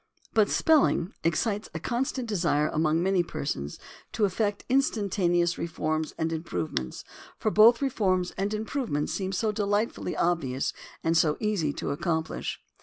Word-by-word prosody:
But 215 Hz, -2 st, +4 dB
spelling 280 Hz, -, +3 dB
excites 200 Hz, +6 st, 0 dB
a -, -, -2 dB
constant 250 Hz, -, -2 dB
desire 170 Hz, -7 st, +1 dB
among 160 Hz, +2 st, +1 dB
many 190 Hz, -1 st, +3 dB
persons 105 Hz, -, -4 dB, 0.4 s
to 215 Hz, -, +2 dB
effect 205 Hz, +1 st, -1 dB
instantaneous 190 Hz, -9 st, +1 dB
reforms 155 Hz, -1 st, -2 dB
and 165 Hz, 0 st, -1 dB
improvements, 85 Hz, -, -3 dB, 0.3 s
for 215 Hz, -, 0 dB
both 230 Hz, +5 st, +6 dB
reforms 185 Hz, -9 st, +1 dB
and 195 Hz, +2 st, -2 dB
improvements 215 Hz, -, -2 dB
seem 190 Hz, -1 st, -2 dB
so 215 Hz, +3 st, 0 dB
delightfully 205 Hz, -2 st, -1 dB
obvious 140 Hz, -7 st, 0 dB, 0.3 s
and 165 Hz, +1 st, +2 dB
so 160 Hz, -2 st, +3 dB
easy 205 Hz, -9 st, 0 dB
to -, -, -3 dB
accomplish. 160 Hz, +2 st, -2 dB
180 Hz, 135 wpm, -27 LUFS, 160-215 Hz, 0.4 s, both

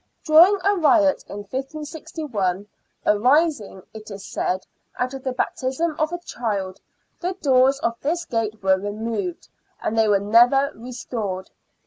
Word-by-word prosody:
During 340 Hz, +5 st, +7 dB
a 405 Hz, 0 st, +3 dB
riot 305 Hz, -3 st, +3 dB
in 205 Hz, -, -7 dB
1561, 270 Hz, -, -4 dB, 0.4 s
arising, 250 Hz, -, +2 dB
it 215 Hz, 0 st, -10 dB
is 200 Hz, -1 st, -8 dB
said, 185 Hz, +1 st, -2 dB, 0.3 s
out 255 Hz, +1 st, -1 dB
of 265 Hz, -1 st, -7 dB
the 260 Hz, -, -1 dB
baptising 265 Hz, +5 st, -1 dB
of 310 Hz, +1 st, +1 dB
a 350 Hz, -, -2 dB
child, 205 Hz, -, -4 dB, 0.4 s
the 360 Hz, +2 st, -2 dB
doors 270 Hz, -6 st, +3 dB
of 230 Hz, -, 0 dB
this 340 Hz, +4 st, -1 dB
gate 220 Hz, -3 st, -3 dB
were 190 Hz, 0 st, +3 dB
removed, 205 Hz, -2 st, -4 dB, 0.3 s
and 220 Hz, -, -2 dB
they 225 Hz, -1 st, +3 dB
were 205 Hz, -1 st, +4 dB
never 240 Hz, +7 st, +4 dB
restored. 225 Hz, -5 st, -5 dB
250 Hz, 140 wpm, -23 LUFS, 205-305 Hz, 0.4 s, During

